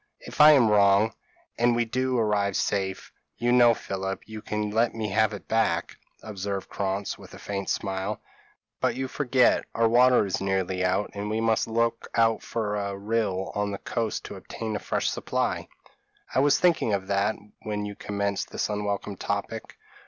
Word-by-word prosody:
If - - -2
I 150 +1 +10
am 130 -6 +5
wrong, 105 +1 +4 0.5
and 120 0 +4
we 120 0 +1
do 130 +2 0
arrive 105 -3 +1
safe, 95 -2 -1 0.3
you 120 +1 +1
know, 120 -1 +6
Philip, 95 -1 -5
you 110 -1 -8
can 105 -1 -3
let 115 +2 +1
me 110 -2 -2
have 110 +2 +2
it 105 - -8
back," 100 -7 0 0.3
observed 100 -2 -4
Krantz, 100 0 -3
with - - -12
a - - -10
faint 100 -1 -4
smile 95 +1 -2 0.6
"but - - +1
you 130 0 -2
forget, 130 -2 +2
our 115 0 +3
water 125 0 +5
is 95 - -2
nearly 95 -1 0
out, 95 +3 0
and 100 +1 -4
we 110 +1 -1
must 115 -1 +1
look 115 +1 0
out 115 -1 +3
for 105 -3 -2
a 100 -1 -3
rill 100 -2 -1
on 105 0 -1
the 100 - -4
coast 115 +1 -3
to - - -7
obtain 110 -1 -5
a - - -2
fresh - - -1
supply." - - -1 0.7
"I - - +3
was 140 +1 +4
thinking 165 - +3
of 95 -1 -1
that 100 +2 +1 0.3
when 105 -1 -3
you 105 - -5
commenced 100 -1 -2
this - - -2
unwelcome 105 -1 -3
topic. - - -4
105 Hz, 180 wpm, -26 LUFS, 100-115 Hz, 0.7 s, I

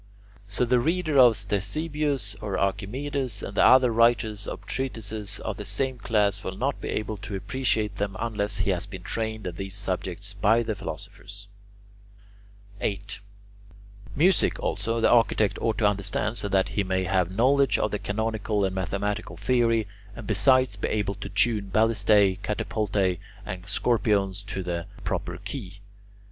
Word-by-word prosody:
So 105 +4 +1
the 125 +1 +3
reader 155 +1 +1
of 125 -3 +8
Ctesibius 135 - -1
or 105 -3 -2
Archimedes 125 +4 -2
and 100 - -5
the - - +4
other 130 -2 +6
writers 110 -3 +2
of - - -6
treatises 110 -6 -1
of - - -4
the - - -5
same 130 -2 0
class 105 -2 +1
will 95 0 -5
not 140 +3 -1
be - - -4
able 110 0 -2
to 100 +1 -6
appreciate 110 -2 -1
them 100 0 -2
unless 105 -3 -1
he 95 +1 +1
has 90 +1 -1
been 95 -3 -9
trained 110 0 -3
in 90 -1 -5
these 95 0 -4
subjects 100 0 -2
by 110 +3 +3
the 110 - -2
philosophers. 100 +3 -8 1.3
8. 100 -1 -3 1.0
Music, 180 +6 +3
also, 115 0 -1
the - - +5
architect 115 -3 +3
ought 110 -3 0
to 105 - +3
understand 105 +2 -1
so 100 - -2
that 95 -1 +2
he 100 - 0
may 95 0 0
have 90 -2 +1
knowledge 130 +8 +3
of 105 - 0
the 105 - -2
canonical 105 -1 -1
and 95 - -2
mathematical 100 +3 -3
theory, 115 -3 +2 0.3
and 115 - -8
besides 120 +3 +3
be - - -2
able 105 -2 -1
to 100 +2 -8
tune 105 -4 +1
ballistae, 105 -2 +3
catapultae, 100 -4 -1 0.3
and 90 0 -6
scorpiones 100 -5 +1
to 95 -2 -4
the 85 0 -3 0.2
proper 90 - -3
key. 100 -8 -7
105 Hz, 155 wpm, -26 LUFS, 100-115 Hz, 1.3 s, of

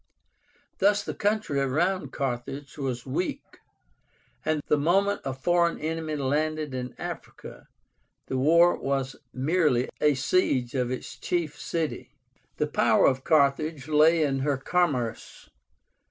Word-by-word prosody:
Thus 205 +1 +3
the - - -4
country 210 -8 0
around 170 +8 0
Carthage 135 +1 -4
was 130 -4 -4
weak, 145 +7 -4 0.8
and 155 -2 -1
the - - +3
moment 195 +6 +2
a 135 - -2
foreign 170 +6 +1
enemy 160 0 -3
landed 150 +1 -1
in 125 -1 -5
Africa - - -8 0.6
the - - -4
war 170 +5 +5
was 135 -1 -2 0.2
merely 140 -2 +1
a 150 -1 +4
siege 130 -4 +1
of 125 -3 0
its 130 - -5
chief 160 -4 -2
city. 165 -2 -4 0.4
The - - +1
power - - +3
of 130 -1 +2
Carthage 150 -1 +2
lay 155 +2 +4
in 135 -2 0
her 140 0 0
commerce. 135 -6 -2
150 Hz, 125 wpm, -26 LUFS, 135-170 Hz, 0.8 s, war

